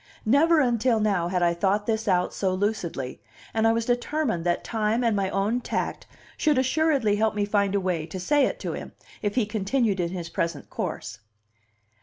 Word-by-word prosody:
Never 310 Hz, +8 st, +4 dB
until 240 Hz, -2 st, +2 dB
now 200 Hz, -5 st, +1 dB
had 180 Hz, 0 st, 0 dB
I 170 Hz, 0 st, +3 dB
thought 195 Hz, +4 st, 0 dB
this 220 Hz, 0 st, -1 dB
out 180 Hz, -2 st, +2 dB
so 190 Hz, -2 st, 0 dB
lucidly, 180 Hz, -10 st, -3 dB, 0.3 s
and 225 Hz, 0 st, +2 dB
I -, -, +5 dB
was 230 Hz, 0 st, 0 dB
determined 245 Hz, -, 0 dB
that 175 Hz, 0 st, 0 dB
time 220 Hz, +1 st, 0 dB
and 230 Hz, -3 st, +2 dB
my 195 Hz, -1 st, 0 dB
own 205 Hz, +6 st, 0 dB
tact -, -, -3 dB, 0.3 s
should 300 Hz, -3 st, +2 dB
assuredly 260 Hz, -5 st, +2 dB
help 220 Hz, 0 st, +1 dB
me 205 Hz, -1 st, +1 dB
find 200 Hz, -1 st, +1 dB
a -, -, +3 dB
way 175 Hz, -4 st, -2 dB
to 185 Hz, +3 st, -6 dB
say 280 Hz, +10 st, +3 dB
it -, -, -5 dB
to -, -, -3 dB
him, -, -, -7 dB, 0.3 s
if 205 Hz, -1 st, -1 dB
he 245 Hz, -4 st, +2 dB
continued 210 Hz, 0 st, 0 dB
in 170 Hz, -1 st, 0 dB
his 175 Hz, -2 st, -5 dB
present 165 Hz, -4 st, -3 dB
course. -, -, -4 dB
210 Hz, 195 wpm, -25 LUFS, 185-240 Hz, 0.3 s, I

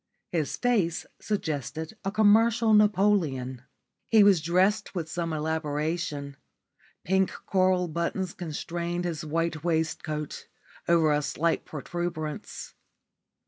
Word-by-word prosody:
His 160 Hz, -5 st, -1 dB
face 210 Hz, -10 st, +1 dB
suggested 160 Hz, -, -3 dB
a 195 Hz, -, -1 dB
commercial 220 Hz, +2 st, +4 dB
Napoleon. 185 Hz, -, +2 dB, 0.5 s
He 220 Hz, -2 st, +7 dB
was 195 Hz, -5 st, +5 dB
dressed 190 Hz, +6 st, +1 dB
with 165 Hz, -3 st, -2 dB
some 165 Hz, +1 st, -3 dB
elaboration; 155 Hz, -1 st, -2 dB, 0.7 s
pink 190 Hz, +2 st, +2 dB, 0.2 s
coral 185 Hz, -1 st, +2 dB
buttons 170 Hz, +3 st, -2 dB
constrained 175 Hz, +1 st, -4 dB
his 165 Hz, -3 st, -3 dB
white 160 Hz, 0 st, -2 dB
waistcoat 160 Hz, -2 st, -2 dB, 0.4 s
over 165 Hz, -2 st, +4 dB
a 150 Hz, 0 st, +2 dB
slight 165 Hz, +3 st, -1 dB
protuberance. 155 Hz, 0 st, -5 dB
170 Hz, 100 wpm, -27 LUFS, 155-190 Hz, 0.7 s, He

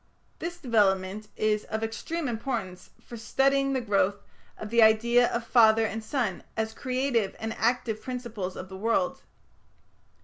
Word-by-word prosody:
This 345 Hz, +1 st, -5 dB
development 210 Hz, -, +1 dB
is 215 Hz, -1 st, +1 dB
"of 220 Hz, 0 st, -3 dB
extreme 305 Hz, +8 st, -3 dB
importance 225 Hz, -6 st, -4 dB
for 235 Hz, -, -10 dB
studying 275 Hz, +4 st, +1 dB
the 260 Hz, -, 0 dB
growth 200 Hz, -3 st, +1 dB, 0.4 s
of 215 Hz, 0 st, -7 dB
the 235 Hz, 0 st, +4 dB
idea 235 Hz, +2 st, +5 dB
of 235 Hz, 0 st, -2 dB
father 225 Hz, -2 st, +5 dB
and 220 Hz, +1 st, -4 dB
son, 220 Hz, -6 st, -2 dB, 0.2 s
as 220 Hz, 0 st, -1 dB
creative 255 Hz, -5 st, -1 dB
and 220 Hz, 0 st, -3 dB
active 230 Hz, -2 st, 0 dB
principles 235 Hz, -7 st, -5 dB
of 185 Hz, -, -7 dB
the 190 Hz, 0 st, -9 dB
world". 230 Hz, +7 st, 0 dB
225 Hz, 145 wpm, -27 LUFS, 215-250 Hz, 0.4 s, idea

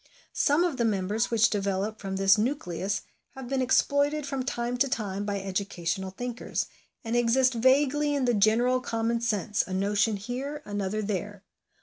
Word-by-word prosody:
Some 295 Hz, +4 st, +3 dB
of 340 Hz, -7 st, -1 dB
the 235 Hz, -, +1 dB
members 210 Hz, +1 st, 0 dB
which 230 Hz, -2 st, +3 dB
develop 200 Hz, +1 st, -1 dB
from 195 Hz, -1 st, -4 dB
this 195 Hz, 0 st, +5 dB
nucleus 200 Hz, -, -2 dB, 0.3 s
have 265 Hz, -2 st, -7 dB
been 265 Hz, +1 st, 0 dB
exploited 285 Hz, +3 st, +2 dB
from 275 Hz, -2 st, -3 dB
time 240 Hz, -1 st, -2 dB
to 275 Hz, +2 st, +2 dB
time 205 Hz, -4 st, -2 dB
by 200 Hz, -1 st, -2 dB
educational 190 Hz, -1 st, -3 dB
thinkers, 245 Hz, +5 st, -3 dB, 0.4 s
and 230 Hz, 0 st, -2 dB
exist 245 Hz, +2 st, +3 dB
vaguely 285 Hz, +4 st, +3 dB
in 275 Hz, -2 st, +1 dB
the 245 Hz, -, +2 dB
general 230 Hz, +5 st, +3 dB
common 230 Hz, -1 st, -1 dB
sense, 215 Hz, -2 st, 0 dB
a 185 Hz, -, -3 dB
notion 205 Hz, +3 st, +1 dB
here, 265 Hz, +8 st, -5 dB
another 205 Hz, +1 st, -2 dB
there. 205 Hz, 0 st, -4 dB
225 Hz, 160 wpm, -27 LUFS, 200-255 Hz, 0.4 s, this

